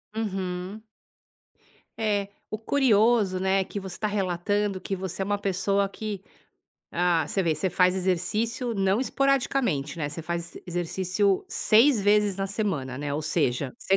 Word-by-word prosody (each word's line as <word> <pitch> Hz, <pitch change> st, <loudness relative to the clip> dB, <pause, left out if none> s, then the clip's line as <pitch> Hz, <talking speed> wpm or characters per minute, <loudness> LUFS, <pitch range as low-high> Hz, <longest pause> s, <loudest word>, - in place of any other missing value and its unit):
Uhum. 190 Hz, -1 st, -3 dB, 1.2 s
É, 205 Hz, -2 st, 0 dB, 0.2 s
o 215 Hz, -, -2 dB
curioso, 225 Hz, -6 st, +3 dB
né, 190 Hz, +1 st, +2 dB
que 200 Hz, -, -6 dB
você 190 Hz, -1 st, -7 dB
tá 215 Hz, -, -1 dB
relatando 200 Hz, 0 st, 0 dB
que 195 Hz, +1 st, -3 dB
você 190 Hz, 0 st, -5 dB
é -, -, -4 dB
uma 205 Hz, +1 st, 0 dB
pessoa 195 Hz, 0 st, +1 dB
que 205 Hz, -2 st, -5 dB, 0.7 s
ah, 175 Hz, -2 st, +2 dB
você 195 Hz, -, 0 dB
vê, 165 Hz, -2 st, +1 dB
você 170 Hz, +5 st, -1 dB
faz 180 Hz, 0 st, +3 dB
exercício 215 Hz, +6 st, -1 dB
não 195 Hz, +2 st, +2 dB
esporadicamente, 260 Hz, -, +1 dB
né, 145 Hz, -2 st, -1 dB
você 155 Hz, +3 st, -6 dB
faz 170 Hz, +1 st, -4 dB
exercício 185 Hz, +3 st, 0 dB
6 230 Hz, +3 st, +4 dB
vezes 205 Hz, -1 st, +3 dB
na 195 Hz, 0 st, -1 dB
semana, 165 Hz, -, -2 dB
né, 145 Hz, -1 st, -3 dB
ou 155 Hz, -, -2 dB
seja 140 Hz, -4 st, 0 dB
você 195 Hz, -, +2 dB
195 Hz, 150 wpm, -26 LUFS, 175-210 Hz, 1.2 s, 6